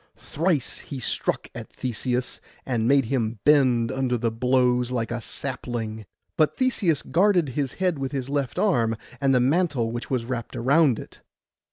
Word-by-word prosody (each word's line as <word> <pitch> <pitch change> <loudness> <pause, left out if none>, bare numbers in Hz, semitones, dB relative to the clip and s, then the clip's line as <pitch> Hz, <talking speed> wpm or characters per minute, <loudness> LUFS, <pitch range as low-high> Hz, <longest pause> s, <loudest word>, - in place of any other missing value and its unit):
Thrice 160 -4 -1
he 140 - -7
struck 120 - -2
at - - -8
Theseus, 125 +1 -3 0.2
and 115 -3 0
made 135 -1 +4
him 115 -2 -1
bend 130 -6 +4
under 130 -2 0
the 115 0 0
blows 125 +1 +2
like 120 -2 -2
a 120 0 -3
sapling; 115 -5 -5 0.3
but 155 -2 +2
Theseus 225 - +1
guarded 180 -4 +3
his 135 0 -2
head 180 -5 0
with 135 -1 -3
his 135 -2 -3
left 140 -3 -2
arm, 115 - +2 0.3
and 135 -1 +3
the - - +5
mantle 135 -3 +1
which 120 +1 -5
was 125 -3 -1
wrapt 120 -2 -4
around 135 0 +3
it. - - -11
130 Hz, 165 wpm, -25 LUFS, 120-145 Hz, 0.3 s, the